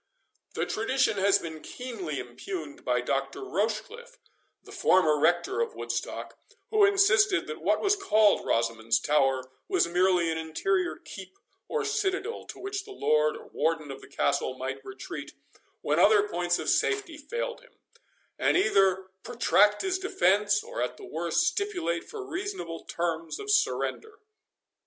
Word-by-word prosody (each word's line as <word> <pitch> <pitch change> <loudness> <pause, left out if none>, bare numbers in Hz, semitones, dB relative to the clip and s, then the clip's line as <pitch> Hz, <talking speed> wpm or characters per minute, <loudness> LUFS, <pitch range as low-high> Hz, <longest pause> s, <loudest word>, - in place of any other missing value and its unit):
This - - -2
tradition 270 - +1
had 195 +1 +4
been 160 -2 -7
keenly 215 - -6
impugned 145 +5 -7
by 125 -1 +1
Dr. 135 +2 -2
Rochecliffe, 225 - -3 0.5
the - - -14
former 155 -5 +3
rector 175 - +2
of 465 -1 -2
Woodstock, - - -5 0.3
who 430 -1 +4
insisted, 400 0 +4
that 460 - -7
what - - +1
was 405 0 +3
called 215 - +3
Rosamond's 115 -1 +1
Tower, 135 -3 +2 0.2
was 375 -1 +2
merely 175 -1 +2
an 160 - -2
interior 350 - -1
keep, 190 -1 -11 0.3
or 455 -2 -1
citadel, 420 0 -2
to - - -9
which 395 0 -4
the 415 - -15
lord 460 +3 +1
or 455 - -13
warden 160 -3 -1
of 135 - -9
the - - -13
castle - - -1
might - - -5
retreat, 395 0 -8 0.5
when - - +1
other 420 -1 +5
points - - 0
of - - -5
safety 405 -6 +1
failed 480 - -4
him; - - -21 0.7
and - - +3
either 195 - +3 0.2
protract 210 -3 +3
his 375 -1 0
defence, 205 - +2
or, - - -5
at 125 0 -2
the - - -10
worst, 165 +1 0
stipulate 360 - -1
for 420 -3 -6
reasonable 360 - -5
terms 165 -1 -3
of 415 0 -3
surrender. 440 +1 0
225 Hz, 150 wpm, -28 LUFS, -, 0.7 s, other